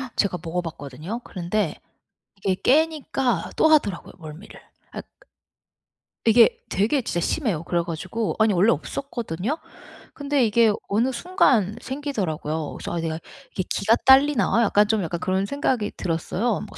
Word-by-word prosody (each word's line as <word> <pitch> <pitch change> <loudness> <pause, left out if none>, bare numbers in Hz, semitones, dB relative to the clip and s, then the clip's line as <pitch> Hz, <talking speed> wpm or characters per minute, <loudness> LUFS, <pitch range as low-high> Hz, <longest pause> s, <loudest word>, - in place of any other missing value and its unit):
제가 195 -3 +1
먹어 170 +2 -2
봤거든요. 160 - -7
그런데 180 0 -2 0.7
이게 190 -2 +2
깨니까 270 - +1
또 - - +4
하더라고요, 245 - +1
멀미를. 160 +3 -11 0.3
아 - - -6 1.2
이게 230 0 +7 0.2
되게 225 +9 +1
진짜 175 -7 -2
심해요. 195 - -1
그래 170 0 0
가지고 175 +6 -3
아니 215 -1 +4
원래 195 +6 +4
없었거든요. 230 - -3 0.6
근데 285 -3 +1
이게 225 0 +4 0.2
어느 230 +6 +1
순간 240 - +2
생기더라고요. 180 - -3
그래서 - - -6
'아 - - -1
내가 165 0 -3 0.3
이게 185 - -2
기가 215 +3 +2
딸리나?' 265 -3 +5
약간 210 -1 +3
좀 220 -1 +1
약간 170 0 -3
그런 190 +1 0
생각이 255 -3 -1
들었어요. 190 +6 -1
뭐 - - -13
210 Hz, 325 characters per minute, -23 LUFS, 175-250 Hz, 1.2 s, 이게